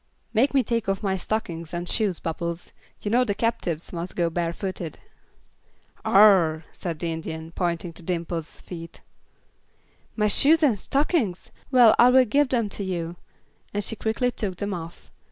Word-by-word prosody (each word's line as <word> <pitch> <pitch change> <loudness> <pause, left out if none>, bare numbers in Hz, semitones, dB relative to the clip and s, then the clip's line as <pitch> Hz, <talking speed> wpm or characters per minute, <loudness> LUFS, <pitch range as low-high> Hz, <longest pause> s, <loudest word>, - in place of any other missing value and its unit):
"Make 260 +6 +2
me 265 - +5
take 230 -3 -1
off 195 +2 -1
my 195 -2 +1
stockings 175 -4 -3
and 175 0 -4
shoes, 200 -5 0
Bubbles. 170 +1 -4 0.3
You 205 - -2
know 245 +2 +4
the 205 -5 -1
captives 195 -10 -2
must 175 +1 -5
go 170 -2 +1
barefooted." 170 0 -3 1.1
"Ugh!" 185 -6 +5
said 170 -3 -5
the 170 +1 -2
Indian, 160 0 -6
pointing 170 -1 -2
to 175 - -9
Dimple's 170 -2 -4
feet. 165 -2 -9 1.1
"My 210 - +1
shoes 310 +10 +4
and 240 -9 +3
stockings? 270 - 0 0.2
Well, 245 -4 +7
I 240 - +8
will 255 0 +6
give 280 +4 +2
them 235 -5 +1
to 200 - -4
you," 175 -3 -3 0.6
and 205 - 0
she 225 - -1
quickly 225 +4 0
took 205 -5 -4
them 200 +2 -3
off. 165 -1 -8
190 Hz, 160 wpm, -25 LUFS, 170-225 Hz, 1.1 s, I